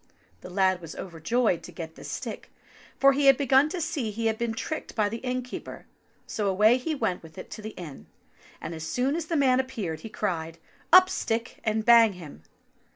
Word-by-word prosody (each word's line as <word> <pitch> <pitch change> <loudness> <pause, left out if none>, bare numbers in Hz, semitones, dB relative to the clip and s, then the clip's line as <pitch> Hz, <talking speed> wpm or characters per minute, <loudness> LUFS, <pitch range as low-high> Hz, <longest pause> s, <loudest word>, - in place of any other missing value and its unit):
The - - -10
lad 185 -1 +1
was 165 -1 -9
overjoyed 185 +3 -1
to - - -11
get 160 -2 -7
this - - -10
stick, - - -6 0.5
for 275 0 +6
he 280 +1 +2
had 270 -2 +7
begun 275 +2 +4
to 360 - -4
see 305 -8 -2
he 225 +2 -4
had 220 -1 0
been 235 -1 -1
tricked 230 +8 -5
by 210 -2 +2
the 225 - -4
innkeeper, 250 0 -5 0.4
so 210 -2 -2
away 210 +5 +4
he 310 +5 -3
went 185 -10 -1
with 160 +2 -15
it 185 - -9
to - - -7
the 215 0 -8
inn, 155 -6 -9 0.5
and 160 - -6
as 160 - -7
soon 250 - 0
as 330 -1 -3
the 330 - 0
man 260 -2 +4
appeared 225 -12 -3
he 225 - -8
cried: 165 -6 -3 0.3
"Up, 370 +2 +9
stick, 230 -9 -3
and 220 -1 0
bang 230 -3 +7
him 165 - -11
225 Hz, 205 wpm, -27 LUFS, 185-260 Hz, 0.5 s, Up